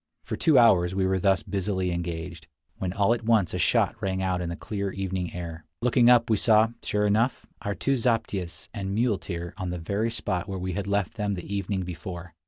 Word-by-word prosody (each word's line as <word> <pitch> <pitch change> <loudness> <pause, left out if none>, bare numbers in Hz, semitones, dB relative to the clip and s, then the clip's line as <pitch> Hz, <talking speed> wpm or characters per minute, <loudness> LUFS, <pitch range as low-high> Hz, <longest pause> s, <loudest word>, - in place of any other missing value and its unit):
For - - -4
two 155 -4 +4
hours 95 -7 +5
we 95 -1 +1
were 95 0 +1
thus 95 -1 +2
busily 95 -2 -1
engaged, 85 -1 -5 0.3
when 95 -2 -2
all 100 +4 +3
at 120 - -4
once 110 -5 +2
a - - -2
shout - - +2
rang 95 -1 -1
out 95 -1 0
in 85 - -3
the 85 - -3
clear 100 +1 -4
evening 95 -2 -3
air. 85 -2 -6 0.2
Looking 120 0 +4
up 120 -1 +6
we 110 - +2
saw, 110 +1 +4
sure 105 0 0
enough, 110 +5 +1 0.2
our 100 -2 -2
two 135 +9 0
zaptiehs 110 -7 -1
and 100 -3 -3
muleteer 95 -7 -1
on 95 -3 -3
the 90 - -3
very 100 +7 -1
spot 95 -6 -2
where 95 - -3
we 90 0 -3
had 100 +2 -3
left 100 +2 -1
them 105 -2 -1
the 95 +3 -5
evening 100 -1 -2
before. 90 0 -7
95 Hz, 210 wpm, -26 LUFS, 90-105 Hz, 0.3 s, up